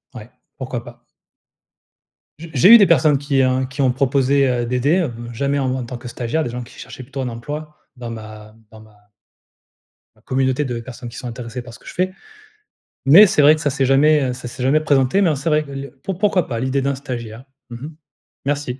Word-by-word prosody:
ouais, 110 Hz, -1 st, -10 dB, 0.3 s
pourquoi 125 Hz, -3 st, -5 dB
pas. 120 Hz, 0 st, -15 dB, 1.4 s
J 165 Hz, 0 st, -9 dB
j'ai 140 Hz, +7 st, +5 dB
eu -, -, +11 dB
des 200 Hz, -, +6 dB
personnes 150 Hz, -2 st, +4 dB
qui, 140 Hz, -1 st, +1 dB
heu, 130 Hz, 0 st, +1 dB
qui 130 Hz, +2 st, -4 dB
ont 130 Hz, -, +3 dB
proposé, 135 Hz, +1 st, +2 dB
heu, 120 Hz, -1 st, 0 dB
d'aider, 125 Hz, +8 st, +1 dB
heu, 150 Hz, -9 st, -2 dB, 0.2 s
jamais 140 Hz, +4 st, -1 dB
en 130 Hz, -2 st, -1 dB
tant 125 Hz, +1 st, -7 dB
que 120 Hz, -, -12 dB
stagiaires, 125 Hz, +7 st, -2 dB
des 120 Hz, -, -4 dB
gens 125 Hz, +1 st, -5 dB
qui 120 Hz, -, -14 dB
cherchaient -, -, -10 dB
plutôt 135 Hz, +2 st, -7 dB
un 130 Hz, -, -2 dB
emploi 150 Hz, +6 st, -7 dB, 0.2 s
dans 120 Hz, -1 st, -7 dB
ma 110 Hz, -1 st, -10 dB, 0.2 s
dans 110 Hz, -, -14 dB
ma 105 Hz, -1 st, -21 dB, 1.1 s
ma -, -, -27 dB
communauté 130 Hz, +2 st, 0 dB
de 125 Hz, -3 st, -4 dB
personnes 120 Hz, 0 st, -9 dB
qui 120 Hz, -, -11 dB
sont 125 Hz, -, -6 dB
intéressées 120 Hz, +1 st, -7 dB
par 120 Hz, -1 st, -12 dB
ce -, -, -13 dB
que -, -, -22 dB
je -, -, -9 dB
fais, 185 Hz, +1 st, 0 dB, 0.9 s
mais 165 Hz, +10 st, +9 dB
c'est 155 Hz, -, +2 dB
vrai 150 Hz, +2 st, +7 dB
que 155 Hz, -, -8 dB
ça 145 Hz, -, +1 dB
s'est 135 Hz, -1 st, 0 dB
jamais, 140 Hz, +1 st, +3 dB
heu, -, -, -2 dB
ça 125 Hz, 0 st, -8 dB
s'est 125 Hz, +1 st, -7 dB
jamais 140 Hz, +4 st, +3 dB
présenté, 140 Hz, +4 st, +2 dB
mais 180 Hz, -, +3 dB
en 150 Hz, -, +1 dB
c'est 140 Hz, +5 st, -2 dB
vrai 150 Hz, 0 st, +2 dB
que 140 Hz, -, -12 dB
le 135 Hz, 0 st, -7 dB
pour 190 Hz, -2 st, -4 dB
pourquoi 195 Hz, -4 st, +1 dB
pas 115 Hz, -3 st, -3 dB
l'idée 130 Hz, +2 st, -1 dB
d'un 140 Hz, +1 st, -1 dB
stagiaire? 120 Hz, -3 st, -7 dB, 0.2 s
Mmh 120 Hz, -, -8 dB
mh. 145 Hz, +6 st, -9 dB, 0.5 s
Merci. 140 Hz, -2 st, -2 dB
130 Hz, 225 wpm, -19 LUFS, 120-145 Hz, 1.4 s, eu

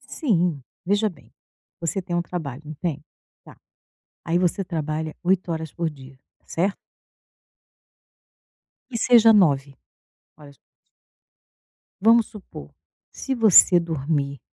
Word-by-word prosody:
Sim, 175 Hz, -, -1 dB, 0.2 s
veja 205 Hz, +3 st, +2 dB
bem, 120 Hz, -, -17 dB, 0.5 s
você 170 Hz, +3 st, -2 dB
tem 175 Hz, -1 st, -5 dB
um 175 Hz, -, 0 dB
trabalho, 155 Hz, -6 st, -6 dB
não 155 Hz, +1 st, -8 dB
tem? 150 Hz, -2 st, -4 dB, 0.4 s
Tá, -, -, -15 dB, 0.7 s
aí 165 Hz, +1 st, +1 dB
você 180 Hz, +2 st, 0 dB
trabalha 155 Hz, -2 st, -4 dB
8 180 Hz, -1 st, +1 dB
horas 160 Hz, -2 st, -4 dB
por 170 Hz, -2 st, -2 dB
dia, 135 Hz, -3 st, -14 dB, 0.3 s
certo? 190 Hz, +4 st, -2 dB, 2.1 s
Que 240 Hz, -, -4 dB
seja 230 Hz, -2 st, +7 dB
9 140 Hz, -4 st, +1 dB, 0.7 s
horas. 145 Hz, -2 st, -15 dB, 1.4 s
Vamos 225 Hz, +2 st, +5 dB
supor 190 Hz, -, -12 dB, 0.4 s
se 270 Hz, -, -3 dB
você 210 Hz, -6 st, +6 dB
dormir 145 Hz, -4 st, -2 dB
170 Hz, 110 wpm, -23 LUFS, 150-190 Hz, 2.1 s, seja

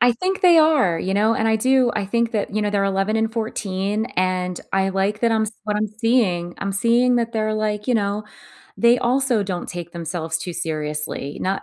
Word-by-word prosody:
I 245 Hz, 0 st, +5 dB
think 375 Hz, -, -2 dB
they 345 Hz, -2 st, +7 dB
are, 290 Hz, -, +3 dB
you 190 Hz, +3 st, -2 dB
know, 215 Hz, +3 st, +3 dB
and 225 Hz, 0 st, 0 dB
I 220 Hz, -, +3 dB
do, 255 Hz, +1 st, +3 dB
I 210 Hz, -2 st, -1 dB
think 235 Hz, +3 st, 0 dB
that 205 Hz, -1 st, -2 dB
you 215 Hz, -, +1 dB
know, 210 Hz, -, 0 dB
they're 200 Hz, -1 st, +1 dB
11 195 Hz, +2 st, 0 dB
and 225 Hz, 0 st, 0 dB
14, 210 Hz, -2 st, -2 dB
and 185 Hz, -1 st, -1 dB
I 195 Hz, 0 st, +1 dB
like 195 Hz, +3 st, -1 dB
that 230 Hz, -1 st, +2 dB
I'm 220 Hz, 0 st, +2 dB
s 215 Hz, -, -3 dB
what 210 Hz, -1 st, -1 dB
I'm 215 Hz, 0 st, -1 dB
seeing. 215 Hz, -6 st, 0 dB
I'm 200 Hz, 0 st, -3 dB
seeing 235 Hz, +5 st, +3 dB
that 235 Hz, 0 st, -1 dB
they're 215 Hz, -1 st, -1 dB
like, 210 Hz, +1 st, -2 dB
you 250 Hz, -, +3 dB
know, 205 Hz, -1 st, -1 dB, 0.5 s
they 235 Hz, +1 st, +4 dB
also 250 Hz, -3 st, +1 dB
don't 185 Hz, -3 st, -4 dB
take 175 Hz, -1 st, -7 dB
themselves 165 Hz, -1 st, -3 dB
too 175 Hz, +2 st, -5 dB
seriously, 150 Hz, -3 st, -4 dB
not 195 Hz, +1 st, -1 dB
210 Hz, 215 wpm, -21 LUFS, 185-230 Hz, 0.5 s, they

